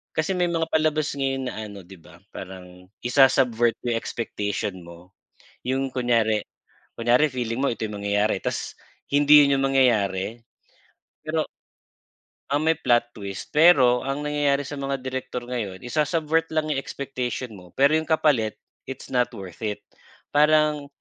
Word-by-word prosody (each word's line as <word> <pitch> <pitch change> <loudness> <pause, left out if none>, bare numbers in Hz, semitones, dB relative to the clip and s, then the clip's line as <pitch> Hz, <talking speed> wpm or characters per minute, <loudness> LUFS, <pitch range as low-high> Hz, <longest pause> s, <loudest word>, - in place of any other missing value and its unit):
kasi 160 +4 0
may 180 - +2
mga 165 -1 0
palabas 155 -1 +1
ngayon 135 -2 -1
na - - -7
ano 100 -1 -10
'di 95 +2 -14
ba, 85 +1 -17
parang 90 -1 -10 0.2
isa-subvert 120 -2 +4
yung 120 -1 +1
expectation 105 -4 -4
mo. 85 +2 -14 0.6
Yung 135 +1 -1
kunyari, 115 -4 +1 0.6
kunyari 120 +6 +3
feeling 120 -3 -3
mo 140 - +2
ito 115 - -4
yung 105 - -6
mangyayari 105 0 +1
ta's - - -3 0.4
hindi 145 +1 +7
yun 140 0 +2
yung 135 - +1
mangyayari. 110 -4 +1 0.8
Pero - - 0 1.1
ang 145 +2 +1
may 160 0 +2
plot 120 -4 +2
twist 100 -4 -8
pero 135 -7 +5
ang 135 +2 -2
nangyayari 145 -1 +1
sa 145 +1 -7
mga 135 -1 -3
direktor 130 -1 -4
ngayon 115 -6 -5
isa-subvert 155 +4 0
lang 155 -1 0
yung 145 - 0
expectation 130 -3 -4
mo 90 -1 -16
pero 140 +3 +4
yung 160 - -4
kapalit 140 -9 +2 0.3
it's 135 -1 -8
not 125 -2 +2
worth 95 -5 -9
it, 105 -1 -4 0.5
parang 150 0 +3
130 Hz, 150 wpm, -24 LUFS, 110-145 Hz, 1.1 s, hindi